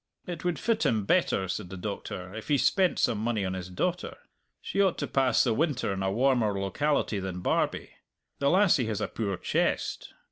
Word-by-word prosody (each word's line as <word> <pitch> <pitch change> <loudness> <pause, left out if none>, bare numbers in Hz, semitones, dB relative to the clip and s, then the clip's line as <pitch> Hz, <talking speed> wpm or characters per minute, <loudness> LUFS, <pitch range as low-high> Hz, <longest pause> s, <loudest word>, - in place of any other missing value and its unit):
"It 175 -3 -6
would 175 -3 0
fit 225 0 0
him 110 -3 +1
better," 130 - +2
said 95 +1 -4
the 95 - -7
Doctor, 95 -1 -6
"if 110 0 -7
he 145 -2 +3
spent 185 +6 +2
some 110 - +1
money 110 -2 -1
on 95 - -2
his 90 -1 -5
daughter. 180 - -2 0.4
She 200 - -1
ought 190 -3 +2
to 145 - -2
pass 130 -4 +2
the 120 - +2
winter 140 -6 0
in 95 - -4
a 95 0 0
warmer 115 -3 +2
locality 110 +2 0
than 95 -2 -5
Barbie. - - 0 0.5
The 140 - +2
lassie 175 - +4
has 110 -3 -2
a - - -1
poor 100 -4 -3
chest! - - -1
115 Hz, 200 wpm, -28 LUFS, 95-155 Hz, 0.5 s, lassie